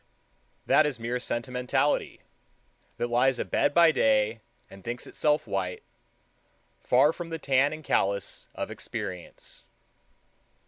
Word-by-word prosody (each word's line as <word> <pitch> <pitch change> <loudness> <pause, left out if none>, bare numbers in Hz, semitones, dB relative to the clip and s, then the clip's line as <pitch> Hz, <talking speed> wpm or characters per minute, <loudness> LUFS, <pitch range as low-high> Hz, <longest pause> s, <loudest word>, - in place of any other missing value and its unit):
That 155 - +5
is 135 -5 -4
mere 120 +2 -2
sentimentality 125 +4 -1 0.8
that - - -1
lies 125 +2 +3
abed - - +1
by 170 +1 +6
day 110 -3 +2 0.3
and 95 -1 -14
thinks 120 +1 -5
itself 150 0 0
white, 90 -2 -3 1.0
far 135 +5 +4
from 170 -1 -7
the 165 - -3
tan 140 -1 +2
and 155 0 -7
callus 100 -7 -1
of - - -4
experience. 90 -2 -7
125 Hz, 120 wpm, -27 LUFS, 110-150 Hz, 1.0 s, by